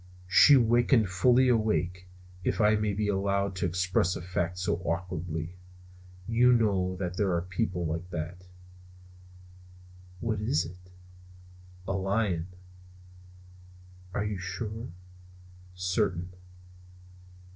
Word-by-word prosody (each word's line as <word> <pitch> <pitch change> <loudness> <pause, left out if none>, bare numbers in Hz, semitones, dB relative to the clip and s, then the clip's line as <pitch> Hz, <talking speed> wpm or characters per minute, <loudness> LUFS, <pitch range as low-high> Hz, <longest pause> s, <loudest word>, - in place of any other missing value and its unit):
She 140 +9 +7
wakened 120 -2 +3
fully 125 +8 +4
awake, 105 -6 0 0.4
if - - -1
I 105 -1 +5
may 105 -1 0
be 105 +1 -1
allowed 100 -1 0
to 90 - 0
express 90 0 +1
a - - -5
fact 90 -1 -2
so 90 -2 0
awkwardly. 85 -1 -4 0.7
You 125 +2 +4
may 115 -2 +4
know 95 -3 0
that 90 -1 -4
there 100 -3 +1
are 85 - 0
people 90 -1 -2
like 85 +3 -3
that. 90 +2 -6 1.7
"What 110 -2 -2
is 90 -6 +1
it?" 90 +1 -12 1.0
"A 95 - -1
lion." 95 -3 0 1.6
"Are 100 +2 -2
you 105 -2 -3
sure?" 105 +5 -5 0.9
"Certain." 90 -1 -1
95 Hz, 115 wpm, -28 LUFS, 90-105 Hz, 1.7 s, She